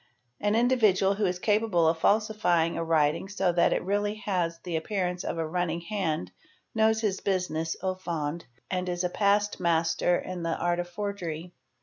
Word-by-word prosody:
= 120 -1 -35
An 210 - +2
individual 220 -5 +3
who 205 0 0
is 180 0 -1
capable 205 -4 +2
of 160 0 +1
falsifying 200 -5 +2
a - - -1
writing 160 +2 +1
so 195 -2 +1
that 170 0 +3
it - - 0
really 205 +2 0
has 175 -4 0
the 175 -2 -4
appearance 180 +1 -2
of - - -3
a 165 - -1
running 170 0 -1
hand 170 - -2 0.4
knows 220 0 +3
his 205 -4 0
business 170 -4 -1
aw 190 0 +1
fond 170 -3 -4 0.3
and 180 -1 -1
is 175 0 -2
a: 180 - +1
past 205 +2 +1
master 170 0 +2
in 185 -1 -5
the 165 -1 -1
art 175 0 0
of 175 0 -3
forgery. 175 -3 -5
180 Hz, 185 wpm, -28 LUFS, 165-200 Hz, 0.4 s, individual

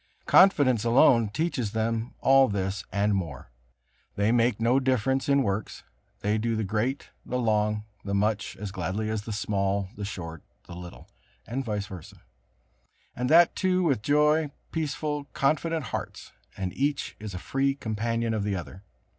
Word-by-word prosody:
Confidence 140 - +5
alone 115 -1 +5
teaches 125 -4 -2
them 115 +2 -2
all 135 0 +6
this, 95 -2 -2
and 100 +2 +1
more. 80 -11 -4 0.6
They 105 +2 +2
make 120 -2 +2
no 120 +4 +3
difference 130 +1 0
in 140 -1 +4
works: 100 -1 -3 0.4
they 105 +2 +1
do 115 +1 0
the 110 - -1
great, 110 +7 -2
the 125 - -3
long, 105 -3 +1 0.2
the 100 0 -2
much, 105 +1 0
as 100 -1 -5
gladly 95 +4 -2
as 110 -1 -2
the 110 - -7
small, 100 -1 -1
the 105 - -6
short, 85 -6 -6 0.2
the 90 - -10
little, 90 0 -10 0.4
and 130 +4 -3
vice 105 -4 -2
versa; 95 -5 -11 0.9
and 125 0 -2
that 170 +2 +6
too 185 -1 +1
with 140 -10 +1
joyful, 150 +3 +2 0.2
peaceful, 150 -2 -2
confident 160 +3 0
hearts, - - -5 0.3
and 95 -2 -3
each 140 +1 -1
is 105 -3 -7
a - - -3
free 135 +8 0
companion 115 -1 -2
of 110 -2 -1
the 100 -1 -1
other. 90 +1 -7
110 Hz, 160 wpm, -27 LUFS, 100-135 Hz, 0.9 s, all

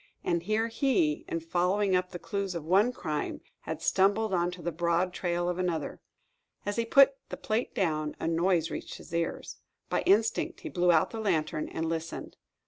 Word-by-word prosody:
And 170 -1 +1
here 215 +5 0
he, 225 - +1
in 165 - -2
following 185 +4 +1
up 180 0 +1
the 175 - -6
clues 200 -1 -3
of 165 -3 -4
one 195 +8 +4
crime, 155 -10 -3 0.2
had - - -6
stumbled 200 +2 +2
upon 175 -1 +2
the 175 0 -3
broad 170 +2 0
trail 175 -1 -1
of 180 0 -1
another. 170 -5 -2 0.6
As 205 +2 -2
he 230 - +1
put 275 +3 +6
the - - -5
plate 250 -5 -2
down, 155 -5 0
a - - -2
noise 165 0 +2
reached - - -5
his - - -13
ears. 170 0 -2 0.3
By - - +2
instinct, 225 - +2
he 330 - -5
blew 180 -7 +3
out 160 -2 +3
the 225 - -5
lantern 160 -7 0
and 160 - -3
listened. 165 0 -4
180 Hz, 185 wpm, -29 LUFS, 165-210 Hz, 0.6 s, put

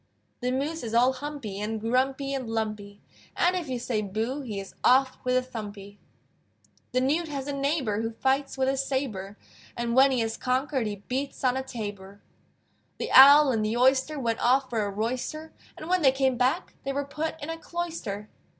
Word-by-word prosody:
The 250 0 -1
Moose 290 +5 -2
is 230 -1 -4
all 250 +2 +5
humpy, 260 -7 -6
And 220 +1 -2
grumpy 265 +4 0
and 260 -4 -3
lumpy, 215 -2 -4 0.3
And 360 +1 +3
if 345 -6 -3
you 255 - -1
say, 235 -2 -2
"Boo!" 220 +8 -3
He 220 -7 -5
is 195 - -9
off 260 +1 +4
with 255 0 +2
a 255 - +1
thumpy. 205 -4 -8 0.9
The 255 - +2
Newt 300 +6 +1
has 280 -3 -4
a 285 - -3
neighbor 275 -7 0
Who 225 - -1
fights 265 +5 -1
with 260 0 +1
a 270 0 +1
sabre, 255 -8 -3 0.4
And 235 0 -1
when 270 +1 +7
he 255 -3 +1
has 225 0 -2
conquered 260 -1 0
He 205 -1 -6
beats 270 +2 -3
on 255 -1 +3
a 265 - -1
tabor. 205 -6 -7 0.8
The - - -4
Owl 280 +1 +9
and 220 -3 0
the 215 +2 -1
Oyster 265 +4 +3
Went 230 -3 -1
off 260 +2 +3
for 225 -2 0
a 205 - -2
royster, 250 +9 -4 0.2
And 310 - -8
when 365 0 +2
they 270 -4 +6
came 265 -1 +1
back 255 +8 0
They 275 - -2
were 285 +1 -2
put 310 +3 -4
in 305 +1 -5
a 325 - -5
cloister. 325 -14 -5
255 Hz, 195 wpm, -27 LUFS, 225-275 Hz, 0.9 s, Owl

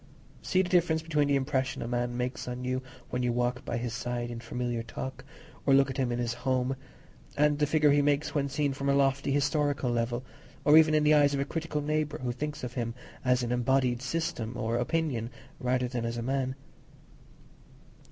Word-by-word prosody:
See 185 0 +2
the 180 - -4
difference 170 -3 +2
between 150 -3 +1
the 140 - +3
impression 135 -1 -1
a - - -4
man 120 0 -1
makes 125 +1 -3
on 125 0 -4
you 130 0 -1 0.3
when 125 - -1
you 125 -1 +1
walk 125 +1 -1
by - - -2
his 120 -1 -3
side 120 0 -3
in 120 - -5
familiar 120 0 -3
talk, 130 +3 -6 0.4
or 135 - +5
look 135 0 +4
at 130 - -6
him 130 -3 0
in 120 - -1
his 120 -1 -1
home, 130 +1 0 0.6
and 150 0 +3
the 150 - +3
figure 150 -1 +4
he 145 0 +4
makes 145 +1 +1
when 140 -2 0
seen 145 0 0
from 140 +1 -2
a 140 - +4
lofty 135 0 +2
historical 145 -2 +1
level, 120 +1 -1 0.4
or 150 - +7
even 155 -1 +7
in 155 - +3
the 150 0 +5
eyes 145 -1 +5
of - - -1
a 140 - 0
critical 160 0 -3
neighbour 150 0 -1
who 125 -1 -2
thinks 150 +3 -5
of 125 -1 -4
him 115 -2 -3 0.3
as 125 -1 +2
an 120 - -2
embodied 125 0 +2
system 130 -5 -2
or 115 -1 -1
opinion 125 -3 -1 0.3
rather 125 0 +1
than 120 -1 -3
as 115 0 -2
a 115 - -3
man. 130 +1 -1
130 Hz, 210 wpm, -29 LUFS, 120-145 Hz, 0.6 s, or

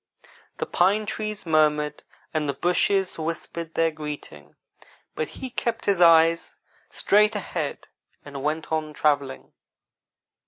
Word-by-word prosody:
The - - -2
pine 200 +4 +2
trees 215 -1 -4
murmured, 150 -2 +2 0.3
and 155 -2 -1
the 140 - -1
bushes 180 +4 +1
whispered 165 0 -5
their 165 0 +2
greeting, 150 - -8 0.6
but 155 - -2
he 260 -1 -7
kept 235 -1 -2
his 195 -3 +2
eyes 165 0 +5 0.3
straight 210 +1 +3
ahead 170 -7 -4 0.4
and 140 -1 -7
went 155 +3 -2
on 155 -1 -1
travelling. 140 -2 -1
160 Hz, 120 wpm, -25 LUFS, 150-190 Hz, 0.6 s, eyes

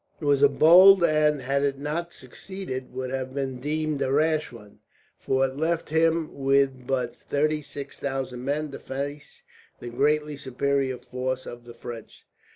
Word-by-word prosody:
It 155 - -6
was 140 -1 +3
a 145 - +7
bold 185 +4 +7
move 170 - +4
and, 150 -2 +2
had 135 +2 0
it 140 -1 0
not 155 +5 -3
succeeded, 130 -2 -8
would 130 0 -5
have 130 0 -4
been 135 -2 -3
deemed 150 +1 -2
a 130 - 0
rash 155 +2 +1
one; 105 -4 -14 0.4
for 135 0 +1
it 135 0 -5
left 165 +2 -1
him 160 0 +1
with 135 -2 +1
but 125 -3 -1
thirty 150 +1 -1
six 140 -1 -8
thousand 135 -3 -4
men 145 +2 -2
to - - -8
face 140 +2 -6 0.4
the 120 - -7
greatly 150 +4 0
superior 135 0 -1
force 130 +1 -4
of 120 0 -9
the 120 - -12
French. 115 -2 -10
140 Hz, 170 wpm, -25 LUFS, 130-155 Hz, 0.4 s, a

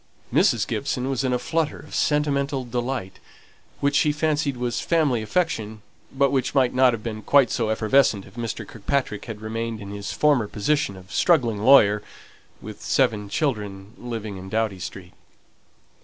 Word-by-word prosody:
Mrs. - - +3
Gibson 130 +2 -2
was 135 -1 -1
in 130 - 0
a 125 - +2
flutter 155 +5 -1
of 150 - -13
sentimental 140 -2 0
delight, 120 -5 -4 0.6
which 140 0 +1
she 150 - +4
fancied 150 -2 0
was 120 -1 -2
family 150 -9 +1
affection, 110 - -2 0.3
but 140 0 +2
which 135 0 -1
might 130 -3 +3
not 130 0 +5
have 110 -2 -5
been 110 -2 -5
quite 135 0 +4
so 115 -2 0
effervescent 110 -1 +2
if 95 - -16
Mr. 115 -2 -5
Kirkpatrick 115 -1 -2
had 110 -3 -7
remained 115 +1 -4
in 100 -1 -8
his 100 0 -5
former 145 -8 +2
position 105 0 -1
of 95 +1 -13
struggling 120 - +2
lawyer, 105 -3 +6 0.6
with - - -9
seven 105 -1 +1
children, 105 -8 -3
living 115 -5 -6
in 95 +1 -9
Doughty 110 -2 -1
Street. 90 0 -8
120 Hz, 160 wpm, -24 LUFS, 105-140 Hz, 0.6 s, lawyer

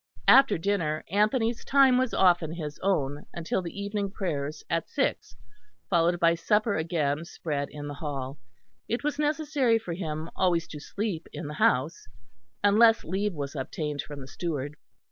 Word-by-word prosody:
After 260 -7 +7
dinner 165 -4 -1
Anthony's 225 +3 +1
time 270 -2 +5
was 255 -2 +1
often 175 -4 +3
his 150 -3 -6
own, 145 -7 -1
until 170 +2 -1
the 175 +3 -7
evening 200 0 -2
prayers 155 -7 -3
at 165 -1 -1
six, - - -1 0.6
followed 170 0 +3
by 170 0 +5
supper 210 +6 +1
again 160 -2 0
spread 150 -4 -4
in 145 -1 -8
the 145 - -5
hall. 140 -2 -5 0.5
It 235 +4 -2
was 295 0 -1
necessary 295 -5 +2
for 200 -6 -5
him 160 -2 -4
always 170 -3 +1
to 150 - -7
sleep 195 +1 -4
in 170 - -6
the 150 - -5
house, 145 -2 +1 0.6
unless 225 +3 +5
leave 195 +3 -2
was 140 0 -5
obtained 145 +2 -3
from 145 -2 -9
the 130 - -9
steward. 145 -2 -4
170 Hz, 160 wpm, -27 LUFS, 150-210 Hz, 0.6 s, After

